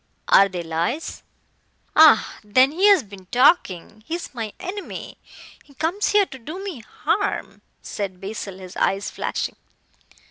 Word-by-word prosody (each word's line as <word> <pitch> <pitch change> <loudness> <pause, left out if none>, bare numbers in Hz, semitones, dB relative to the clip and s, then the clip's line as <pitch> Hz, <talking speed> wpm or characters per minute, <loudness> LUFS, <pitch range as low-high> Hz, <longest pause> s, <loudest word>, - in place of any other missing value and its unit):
"Are 195 0 +7
they 180 -2 -5
lies?" 170 - -3 0.7
"Ah, 310 -7 +6
then, 255 +6 +4
he 370 +6 +3
has 400 -2 +6
been 195 -3 -13
talking. 215 - +2
He 330 - -2
is 345 -4 -7
my 225 -4 -4
enemy. 390 +2 -7 0.4
He 280 - -22
comes 340 +9 -1
here 415 -1 +4
to 270 -6 -11
do 305 +9 -7
me 375 -10 -6
harm," 220 - -2 0.2
said 190 -3 -5
Basil, 195 -1 -6
his 185 -1 -11
eyes 195 +1 0
flashing. - - -3
230 Hz, 145 wpm, -22 LUFS, 195-325 Hz, 0.7 s, Are